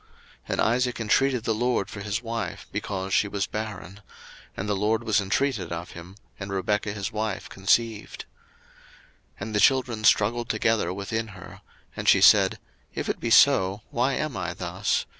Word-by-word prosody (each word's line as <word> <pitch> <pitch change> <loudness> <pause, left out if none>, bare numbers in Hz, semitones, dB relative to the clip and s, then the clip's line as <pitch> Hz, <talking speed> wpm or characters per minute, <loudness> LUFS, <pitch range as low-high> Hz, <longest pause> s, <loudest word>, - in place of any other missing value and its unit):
01:025:021 - - -31 0.4
And - - 0
Isaac 125 +2 +1
intreated 125 +2 +2
the 115 - 0
LORD 120 -2 0
for 100 - -7
his 105 +3 -3
wife, 115 -3 -4
because 95 -2 -4
she 105 - +3
was 100 -1 -2
barren: 105 -2 -6 0.6
and 95 - -3
the 105 - 0
LORD 110 +3 0
was 110 -3 +2
intreated 100 -2 -1
of 85 +1 -5
him, 85 +3 -11 0.2
and 100 -1 -6
Rebekah 100 +2 -1
his 105 -1 -4
wife 105 -2 -3
conceived. 110 +3 0 1.1
01:025:022 - - -20
And 110 - -5
the 105 - +1
children 125 -3 +2
struggled 115 +3 +3
together 110 -4 +1
within 105 +4 -3
her; - - -12 0.3
and - - 0
she - - +6
said, - - +6 0.4
If - - -3
it - - -2
be 120 - -2
so, 105 -6 +4
why 125 +3 +1
am 155 -3 -2
I - - -4
thus? - - -1
105 Hz, 175 wpm, -25 LUFS, 100-115 Hz, 1.1 s, she